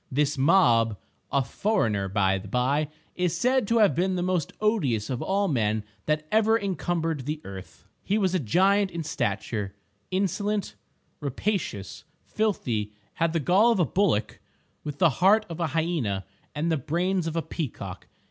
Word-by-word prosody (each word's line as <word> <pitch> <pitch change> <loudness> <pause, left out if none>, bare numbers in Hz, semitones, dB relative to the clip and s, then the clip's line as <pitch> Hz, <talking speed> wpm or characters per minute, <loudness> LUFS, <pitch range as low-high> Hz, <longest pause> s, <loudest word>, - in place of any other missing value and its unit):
This 145 +2 +1
Mob 125 - +4 0.3
(a 140 - +2
foreigner, 115 - 0
by 95 -1 +2
the 100 - -10
by), 130 +7 +1 0.3
is 180 -2 0
said 250 +3 +2
to 230 - +2
have 210 -4 +5
been 185 +2 0
the 175 - -1
most 180 -4 0
odious 140 - +1
of 125 - -2
all 200 +1 +1
men 110 - 0 0.2
that 155 0 0
ever 220 +1 +4
encumbered 165 - -2
the 150 +1 -2
earth. 95 -1 -10 0.2
He 205 - +1
was 190 -4 +1
a 185 - +2
giant 190 - +3
in 170 -2 -5
stature—insolent, 115 - -3 0.5
rapacious, 140 - -3 0.2
filthy, 120 - -1 0.2
had 165 0 0
the 165 - +1
gall 190 - +4
of 225 - +1
a 175 - +4
bullock 155 - 0 0.4
with 145 -2 -5
the 170 0 +5
heart 210 +4 +5
of 165 0 -6
a 170 - +1
hyena 145 - -1 0.3
and 160 +3 0
the 160 - +2
brains 175 +5 -1
of 165 - -3
a 165 - 0
peacock. 115 - -6
160 Hz, 160 wpm, -26 LUFS, 120-190 Hz, 0.5 s, have